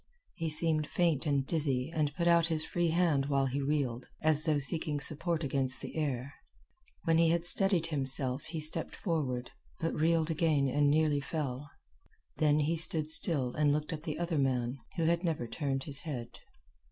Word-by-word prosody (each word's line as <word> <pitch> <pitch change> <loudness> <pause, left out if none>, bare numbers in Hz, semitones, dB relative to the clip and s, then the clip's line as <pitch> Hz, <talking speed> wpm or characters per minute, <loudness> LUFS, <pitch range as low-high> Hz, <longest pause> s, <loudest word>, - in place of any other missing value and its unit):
He 165 -1 -4
seemed 155 -1 +2
faint 165 -4 -1
and 140 -2 0
dizzy 140 -3 -2
and 150 -3 -1
put 170 -1 -1
out 170 -1 +4
his 160 -2 +1
free 175 -1 -1
hand 160 -5 0
while 140 -1 0
he 135 +2 -3
reeled, 135 -4 -2 0.2
as 155 0 +4
though 155 -2 +1
seeking 150 +1 +1
support 160 +3 -1
against 135 -1 0
the - - -8
air. 140 -3 -3 0.7
When 165 0 +1
he 165 -1 +3
had 170 +1 0
steadied 190 -2 +2
himself 135 -2 +3
he 160 -1 -6
stepped 155 +2 -1
forward, 135 - -3 0.3
but 165 - -2
reeled 165 +1 0
again 155 -3 0
and 145 +2 +1
nearly 150 -1 +1
fell. 140 -2 -5 0.7
Then 150 -1 +2
he 160 +3 -1
stood 155 -2 +6
still 145 -7 +2
and 150 -1 +1
looked 150 +3 -2
at 155 - -7
the 155 -2 -6
other 170 -2 -2
man, 130 -1 -1 0.2
who 165 - -2
had 170 +2 0
never 160 -8 -2
turned 135 +2 -4
his 145 -1 +4
head. 125 -7 -7
150 Hz, 180 wpm, -30 LUFS, 140-165 Hz, 0.7 s, stood